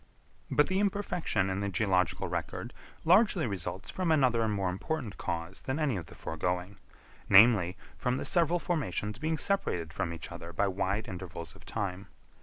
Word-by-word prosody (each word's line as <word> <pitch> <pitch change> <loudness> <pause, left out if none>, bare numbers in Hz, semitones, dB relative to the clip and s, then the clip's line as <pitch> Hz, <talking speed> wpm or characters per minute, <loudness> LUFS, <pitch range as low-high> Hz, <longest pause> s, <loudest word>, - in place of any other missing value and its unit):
But 150 - +4
the 190 +1 0
imperfection 180 - 0
in 95 - -1
the 100 0 -1
geological 95 -3 +1
record - - -4 0.3
largely 185 - +5
results 95 -2 -4
from 185 -3 0
another 130 -7 +4
and 110 -1 +1
more 100 -3 0
important 115 - -4
cause 85 +2 -4
than 130 +2 -2
any 150 -6 +1
of 85 -5 -5
the - - -13
foregoing; 90 +4 -3 0.5
namely, 100 -3 +7 0.2
from 125 0 0
the - - -4
several 170 -1 +3
formations 110 - -2
being 160 +1 0
separated 90 - 0
from 85 - -2
each 85 -2 -7
other 85 +1 -8
by 100 +4 +2
wide 100 +2 -1
intervals 90 -2 -7
of - - -16
time. 100 -3 -3
100 Hz, 170 wpm, -30 LUFS, 90-155 Hz, 0.5 s, namely